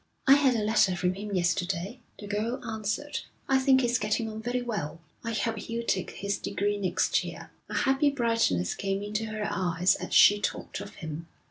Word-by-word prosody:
'I 270 - +8
had 275 -3 +4
a 220 - 0
letter 210 -3 +3
from 180 0 0
him 200 +1 -5
yesterday,' 180 +5 -1 0.2
the 205 - -9
girl 215 +5 -2
answered. 220 +6 -3 0.3
'I 265 -1 +4
think 265 0 +4
he's 245 0 +1
getting 215 +2 0
on 215 0 -6
very 245 +2 -2
well. 200 -10 -4 0.2
I 230 - -3
hope 225 +1 -1
he'll 230 +2 -4
take 185 -5 0
his 200 0 -3
degree 205 +1 -1
next 185 -3 +1
year.' - - -8 0.2
A - - -5
happy 275 +1 +3
brightness 230 - +1
came 195 0 -2
into 210 +2 -2
her 215 -1 -3
eyes 180 0 +2
as - - -6
she 205 0 +8
talked - - -3
of 200 0 -9
him. 160 0 -7
210 Hz, 195 wpm, -28 LUFS, 195-235 Hz, 0.3 s, I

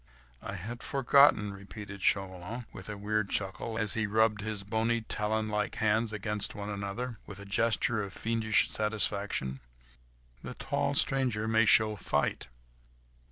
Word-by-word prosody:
"I - - -6
had 115 +6 -6
forgotten," 135 -7 +4
repeated 100 0 -9
Chauvelin, 95 +5 -1
with 95 - -9
a 105 - -5
weird 105 0 -1
chuckle, 105 +3 -3
as 110 -2 -1
he 110 -2 0
rubbed 110 0 +2
his 105 -1 -3
bony, 115 +3 0
talon 110 0 -1
like 105 -1 -1
hands 110 +1 +1
one - - -4
against 105 0 +1
the 105 - -9
other, 105 +3 -4
with 100 -1 -8
a 100 - -9
gesture 110 +2 +1
of 100 -1 -5
fiendish 110 0 +1
satisfaction. 100 -10 -1 0.8
"The - - -7
tall - - -1
stranger 125 -5 +3
may 110 0 +4
show 110 -1 +5
fight. 90 - -1
105 Hz, 150 wpm, -30 LUFS, 100-110 Hz, 0.8 s, show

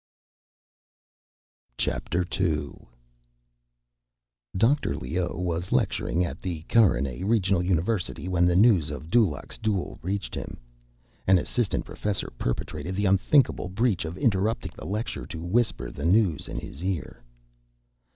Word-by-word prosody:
II - - +1 2.6
Dr. 135 +8 +2
Leoh 85 +8 -2
was 90 0 -2
lecturing 90 +1 +1
at - - -6
the 85 -4 -4
Carinae 80 - +2
Regional 100 -3 +2
University 90 +1 -1
when 90 -1 +3
the 90 - +2
news 95 -6 +5
of 75 +2 -7
Dulaq's 105 -12 +1
duel 105 -5 -2
reached 95 +3 -3
him. - - -5 0.7
An 95 0 +7
assistant 115 +5 -1
professor 105 -10 -3
perpetrated 90 +8 -3
the 100 +2 0
unthinkable 100 +2 +3
breach 105 0 +1
of 80 +2 -5
interrupting 110 -4 +1
the - - -9
lecture 105 +5 -3
to 80 - -7
whisper 105 +3 0
the 70 - -6
news 90 -4 +3
in - - -6
his 80 - -7
ear. 95 -10 -3
95 Hz, 120 wpm, -26 LUFS, 85-105 Hz, 2.6 s, An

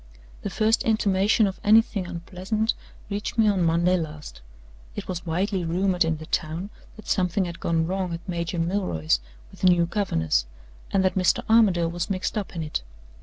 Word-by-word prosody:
"The - - -3
first 220 +1 +2
intimation 210 -1 +3
of 195 -1 -3
anything 215 -3 +4
unpleasant 185 +5 -2 0.4
reached 205 +3 -3
me 220 -1 +4
on 200 -3 +2
Monday 170 +2 +3
last. 150 - -7 0.5
It - - -6
was 180 -1 -5
widely 185 +3 0
rumored 180 +2 +1
in 165 -1 0
the 155 - -9
town 165 +7 -2 0.2
that 215 - -13
something 185 0 +1
had 170 -1 -7
gone 165 -1 +1
wrong 185 0 -2
at 165 +2 -6
Major 170 -1 -3
Milroy's 165 - 0 0.3
with - - -16
the 185 - +4
new 175 -1 +5
governess, 80 - 0 0.4
and 190 -1 +2
that 185 - +2
Mr. 185 -2 +2
Armadale 195 -7 +4
was 175 0 -3
mixed 190 -1 -2
up 205 -4 -4
in 165 - -2
it. 150 - -3
180 Hz, 175 wpm, -25 LUFS, 165-200 Hz, 0.5 s, new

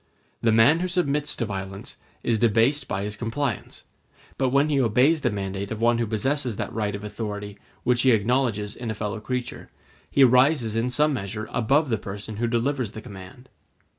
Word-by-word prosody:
The 115 - +3
man 115 +9 +5
who 180 - -1
submits 150 -5 0
to 115 - -2
violence 95 -2 -6 0.3
is 115 -2 +1
debased 120 +6 +2
by 95 0 -2
his 105 +1 -3
compliance; 120 +2 -3 0.5
but 130 -1 +1
when 140 +3 +3
he 140 -2 +2
obeys 130 +7 +3
the 120 - +2
mandate 100 -1 -4
of 110 - -5
one 120 +1 +3
who 115 - 0
possesses 125 +3 -1
that - - -4
right 105 -2 -1
of 100 - -7
authority 105 -1 -6 0.2
which 120 -1 +2
he 130 - +4
acknowledges 110 -2 +1
in 120 -2 -5
a 110 - -3
fellow 105 0 -3
creature, 125 +3 -5 0.4
he 140 - +4
rises 125 -2 +4
in 115 +2 0
some 150 +4 +2
measure 110 -2 -4
above 135 +6 +2
the 110 -3 0
person 105 +2 -7
who 120 +2 0
delivers 120 -1 -1
the 110 - -7
command. 105 +4 -11
115 Hz, 190 wpm, -25 LUFS, 105-130 Hz, 0.5 s, man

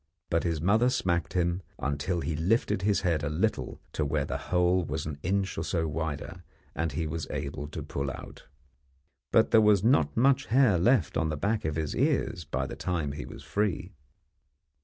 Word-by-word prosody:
But 85 -1 +2
his 85 -3 -1
mother 110 +9 +3
smacked 85 -8 0
him 85 0 +1 0.2
until 70 +6 -1
he 80 - -2
lifted 95 +5 +1
his 100 +1 +2
head 85 -5 +1
a 75 - 0
little 95 +9 -1
to 75 - 0
where 75 -1 0
the - - -3
hole 90 0 +3
was 80 -1 -3
an 75 -2 -5
inch 95 +1 -1
or - - -2
so 80 0 -1
wider, 80 +2 -4 0.3
and 80 +1 -1
he 80 +3 -1
was 80 +1 -4
able 75 0 -4
to 75 0 -6
pull 70 -1 -3
out. - - -9 0.8
But 110 - +4
there 110 - +7
was 105 -2 +4
not 125 +1 +3
much 135 +3 +3
hair 120 -7 +4
left 110 - +3
on 80 - +1
the 75 - -2
back 105 +5 0
of 80 -1 -1
his 80 -2 -2
ears 120 - 0
by 65 -3 -2
the - - -6
time 85 -6 -2
he 75 +1 -6
was - - -10
free. 100 -2 -1
85 Hz, 195 wpm, -28 LUFS, 75-100 Hz, 0.8 s, there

